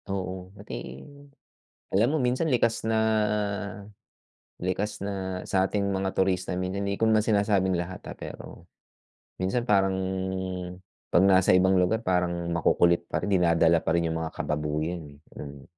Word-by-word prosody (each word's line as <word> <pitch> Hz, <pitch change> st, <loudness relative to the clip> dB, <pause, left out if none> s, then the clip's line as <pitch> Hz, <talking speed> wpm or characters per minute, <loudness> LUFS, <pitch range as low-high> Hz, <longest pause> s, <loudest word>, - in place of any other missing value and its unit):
Oo, 95 Hz, -1 st, -4 dB
pati, 65 Hz, -, -8 dB, 0.9 s
alam 105 Hz, +5 st, +3 dB
mo -, -, +3 dB
minsan 125 Hz, +6 st, +1 dB
likas 115 Hz, -6 st, +1 dB
na 110 Hz, -, +1 dB, 1.6 s
likas 95 Hz, +4 st, -2 dB
na 95 Hz, -2 st, -4 dB
sa 95 Hz, 0 st, +2 dB
ating 100 Hz, -1 st, 0 dB
mga 95 Hz, 0 st, -1 dB
turista 95 Hz, -1 st, +1 dB
minsan 95 Hz, +2 st, -2 dB
hindi 100 Hz, 0 st, -2 dB
ko 115 Hz, -, +2 dB
naman 110 Hz, -1 st, +4 dB
sinasabing 100 Hz, -3 st, +2 dB
lahat 90 Hz, +2 st, -5 dB
ah, -, -, -8 dB
pero -, -, -9 dB, 0.8 s
minsan 105 Hz, +6 st, 0 dB
parang 95 Hz, -3 st, +3 dB, 1.1 s
'pag 90 Hz, -, +4 dB
nasa 95 Hz, -1 st, +5 dB
ibang 95 Hz, +1 st, +4 dB
lugar 110 Hz, +5 st, 0 dB
parang 85 Hz, -2 st, 0 dB
makukulit 85 Hz, 0 st, +2 dB
pa -, -, -1 dB
rin, 100 Hz, -, -1 dB
dinadala 85 Hz, -2 st, +4 dB
pa 80 Hz, +1 st, +1 dB
rin 85 Hz, -, +1 dB
'yung 80 Hz, -, -2 dB
mga 80 Hz, -, -3 dB
kababuyan 75 Hz, +3 st, -2 dB
eh, 70 Hz, 0 st, -16 dB, 0.2 s
mm. 70 Hz, -2 st, -9 dB
95 Hz, 150 wpm, -27 LUFS, 85-100 Hz, 1.6 s, nasa